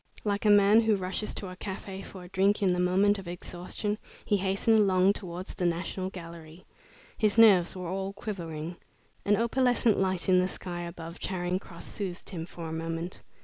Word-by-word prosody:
Like 205 0 -1
a - - +5
man 205 +2 +7
who 220 -2 +3
rushes 190 +2 -3
to 195 - -4
a 180 - -8
cafe 190 0 -6
for 190 -2 -10
a - - -10
drink 195 +2 +2
in 185 -2 +3
a - - -2
moment 195 +3 +3
of 190 - -9
exhaustion, 180 +4 -4 0.3
he 205 - +2
hastened 195 +4 +2
along 190 -1 +4
towards 180 -2 -6
the 180 - 0
National 185 +2 -2
Gallery. 170 -1 -10 0.5
His 215 0 +2
nerves 195 -7 +6
were 180 -1 -5
all 190 +2 -3
quivering. 170 -5 -5 0.5
An 205 0 +4
opalescent 235 -1 +2
light 190 -2 0
in 185 -1 +5
the 180 - +2
sky 175 -2 -3
above 170 0 -8
Charing 180 -1 -2
Cross 170 -3 -10
soothed 190 -3 -5
him 165 -3 -5
for 170 -2 -7
a 160 - -5
moment. 165 +2 -4
185 Hz, 190 wpm, -29 LUFS, 175-205 Hz, 0.5 s, man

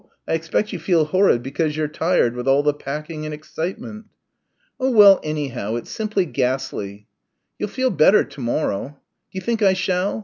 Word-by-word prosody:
I - - -1
expect 165 +6 -1
you 180 - -4
feel 165 -1 +2
horrid 155 -7 +2
because 150 +3 -2
you're 155 -1 0
tired 155 -5 +1
with 125 +1 -5
all 135 +2 +4
the 150 0 +2
packing 150 +2 -6
and 155 0 -4
excitement." 195 +9 -6 0.7
"Oh 260 - +1
well, 205 -5 +7
anyhow, 135 -8 -3
it's 120 - -6
simply 210 -4 -1
ghastly." 125 - -3 0.5
"You'll - - -2
feel 260 +3 0
better 190 +3 +5
to 140 - -11
morrow." 130 +2 -2 0.3
"D'you 190 - -5
think 230 -1 -1
I 195 -2 +5
shall?" 190 +2 -1
155 Hz, 170 wpm, -21 LUFS, 140-195 Hz, 0.7 s, well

